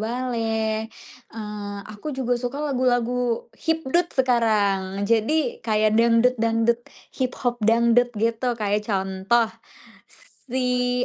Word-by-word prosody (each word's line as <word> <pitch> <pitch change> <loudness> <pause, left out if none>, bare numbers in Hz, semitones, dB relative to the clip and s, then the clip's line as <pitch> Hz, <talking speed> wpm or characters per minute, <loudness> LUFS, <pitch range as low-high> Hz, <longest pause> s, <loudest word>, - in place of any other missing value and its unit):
Bale. 225 -2 -1 0.4
Eee, 210 -2 -6
aku 215 +8 -7
juga 250 -2 0
suka 245 +3 -4
lagu-lagu 250 -3 0
hipdut 325 +2 0
sekarang. 205 -6 +1
Jadi 235 +5 +1
kayak 215 -1 +2
dangdut-dangdut, 230 0 +3 0.4
hip 255 -1 -1
hop 240 0 +1
dangdut 235 +2 +4
gitu 230 +3 0
kayak 210 0 0
contoh, 195 +3 +1 1.0
si 250 -1 +1
230 Hz, 100 wpm, -23 LUFS, 215-250 Hz, 1.0 s, dangdut